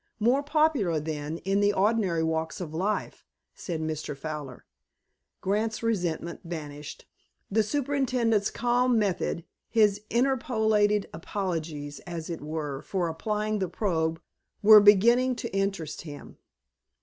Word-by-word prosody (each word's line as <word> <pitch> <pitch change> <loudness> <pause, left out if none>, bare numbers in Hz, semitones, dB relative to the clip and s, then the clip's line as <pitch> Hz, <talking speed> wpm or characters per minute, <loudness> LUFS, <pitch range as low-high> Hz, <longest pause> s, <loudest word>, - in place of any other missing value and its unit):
more 245 +6 +3
popular 290 - +2
than, 150 0 -4
in 195 +1 +2
the 205 0 +4
ordinary 195 -5 +1
walks 160 0 -2
of 165 -4 -6
life," 195 +6 -2 0.3
said 170 -4 -5
Mr. 155 -2 -4
Fowler. 145 -3 -6 0.8
Grant's 215 +4 -1
resentment 175 -6 -1
vanished. 150 -4 -7 0.5
The 220 +2 +4
superintendent's 250 -4 +1
calm 245 +1 +2
method, 185 -4 -1 0.2
his 210 -3 +3
interpolated 220 -5 +2
apologies, 160 -5 -4
as 170 -1 -5
it 165 - -5
were, 150 -2 -4
for 180 -3 -2
applying 210 +5 -2
the 190 -2 -1
probe, 165 -4 -1 0.4
were 210 0 +10
beginning 235 +6 +5
to 215 - -5
interest 195 -6 -2
him. 145 -3 -10
195 Hz, 120 wpm, -27 LUFS, 160-220 Hz, 0.8 s, were